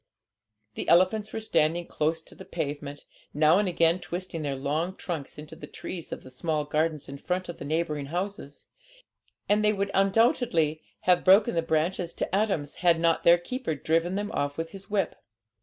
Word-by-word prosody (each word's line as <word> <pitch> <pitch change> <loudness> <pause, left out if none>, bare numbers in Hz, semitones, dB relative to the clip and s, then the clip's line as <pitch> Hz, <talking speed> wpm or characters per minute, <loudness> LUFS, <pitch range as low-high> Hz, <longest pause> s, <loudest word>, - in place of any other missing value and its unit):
The - - -4
elephants 205 +5 +4
were - - -3
standing 170 -5 +1
close 160 +1 -1
to - - -16
the - - -11
pavement, 145 0 -5 0.3
now 155 +4 +5
and 205 - +1
again 170 0 +3
twisting 175 -2 -5
their 140 -2 -2
long 155 +7 -2
trunks 165 -7 -5
into 150 0 -9
the - - -10
trees 175 -3 -7
of - - -6
the 130 - -12
small 150 +3 -1
gardens 155 0 -1
in 140 0 -8
front 185 +3 -2
of 170 - -7
the - - -6
neighbouring 150 -2 -1
houses; 175 -3 -5 0.8
and 210 +1 +3
they 210 0 +4
would 200 -1 -2
undoubtedly 195 - +2 0.2
have 180 -1 +3
broken 200 +5 +6
the 165 - +1
branches 165 +2 -1
to - - -2
atoms 195 -9 0
had 170 -2 +3
not 165 0 +2
their 170 +1 +7
keeper 215 - -4
driven 165 +5 0
them 205 +1 -2
off 145 -8 -2
with 165 0 -4
his 195 0 -11
whip. 205 -2 0
170 Hz, 185 wpm, -27 LUFS, 155-190 Hz, 0.8 s, their